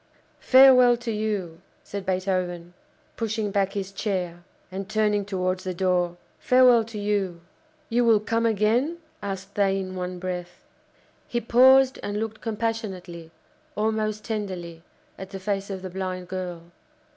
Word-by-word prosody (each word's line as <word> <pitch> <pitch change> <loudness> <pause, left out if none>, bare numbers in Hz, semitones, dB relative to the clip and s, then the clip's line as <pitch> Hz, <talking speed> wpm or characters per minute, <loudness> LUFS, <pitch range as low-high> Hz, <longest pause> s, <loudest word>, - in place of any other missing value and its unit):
"Farewell 255 -2 +7
to 235 -1 -4
you!" 205 -6 -3 0.2
said 200 -2 -7
Beethoven, 180 -2 -2 0.4
pushing 220 -2 -2
back 195 -1 0
his 195 -1 -4
chair, 185 -4 -3 0.3
and 190 +1 -6
turning 210 -2 +1
towards 185 -1 -2
the 185 -2 -4
door 180 -1 +1 0.2
"farewell 250 -2 +5
to 225 -1 -8
you!" 200 -4 -1 0.5
"You 240 +1 +2
will 225 -2 +5
come 230 +2 0
again?" 230 - +1 0.2
asked 195 0 -5
they 195 -1 +2
in 185 -1 -5
one 180 0 -4
breath. 180 -1 -6 0.6
He 240 - -1
paused 260 +3 +5
and 205 0 -3
looked 220 0 -4
compassionately, 210 -7 -4 0.5
almost 215 0 -1
tenderly, 185 -7 -5 0.4
at 190 0 -7
the 195 - -7
face 195 +1 -2
of 190 -1 -5
the 185 - -5
blind 185 -1 -4
girl. 175 -2 -6
200 Hz, 140 wpm, -25 LUFS, 185-220 Hz, 0.6 s, Farewell